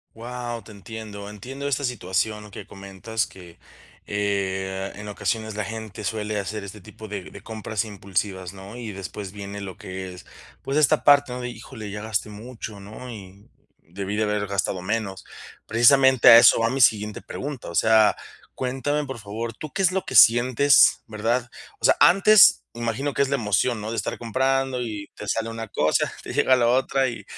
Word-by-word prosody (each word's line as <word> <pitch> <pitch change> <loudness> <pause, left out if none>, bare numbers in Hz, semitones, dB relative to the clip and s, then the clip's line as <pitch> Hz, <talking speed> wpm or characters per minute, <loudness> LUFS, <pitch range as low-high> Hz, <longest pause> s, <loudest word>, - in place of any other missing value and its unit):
Guau, 120 0 -6
te 110 - -13
entiendo. 100 0 -9
Entiendo 135 +7 -6
esta 140 0 -1
situación 105 -2 -2
que 100 0 -9
comentas, 100 +3 -4
que, 90 -1 -14 0.5
eh, 95 -1 -2
en 105 0 -8
ocasiones, 110 +1 -3
la 105 - -2
gente 110 -1 -7
suele 105 0 -2
hacer 100 +1 -5
este 100 +1 -10
tipo 110 +4 -12
de 100 -3 -7
de 100 - -12
compras 110 -1 -3
impulsivas, 95 -2 -4
¿no? 100 +4 -11
Y 115 -3 -6
después 95 0 -7
viene 100 0 -8
lo 95 -2 -7
que 95 0 -7
es, 90 - -13 0.4
pues, 135 +2 -3
esta 155 0 +3
parte, 145 -2 +5
¿no? 125 - -5
De 125 - -4
híjole, 110 -2 -9
ya 105 0 -6
gasté 110 -1 -2
mucho, 110 -1 -9
¿no? 110 +5 -10
Y 100 -3 -11 0.4
debí 95 +4 -5
de 110 - +1
haber 105 -1 -1
gastado 100 -2 -2
menos. 100 -2 -3 0.4
Precisamente 130 +2 +5
a 115 - +11
eso - - +7
va 115 0 +1
mi 135 +1 -2
siguiente 105 -3 +2
pregunta. 140 -8 -6
O 85 - -6
sea, 110 -1 +4 0.4
cuéntame, 135 +3 -1
por 130 -4 -7
favor, 110 +3 -5
¿tú 155 +3 -8
qué 195 - -1
es 185 0 +3
lo 190 - -1
que 130 - -3
sientes, 125 +5 +6
verdad? 115 +3 -1 0.3
O - - -15
sea, - - +5
antes, 195 +1 +7
imagino 120 +4 -2
que - - +2
es 140 - +1
la - - +1
emoción, 110 0 0
¿no?, 110 +2 -5
de 115 - -4
estar 105 - -3
comprando 130 +2 0
y 105 -4 -6
te 105 - -8
sale 115 +3 -1
una 115 0 -6
cosa, 80 -6 0
te - - -7
llega 130 - +4
la 120 -2 +2
otra 130 +1 +2
y 120 - -7
110 Hz, 190 wpm, -24 LUFS, 100-125 Hz, 0.5 s, a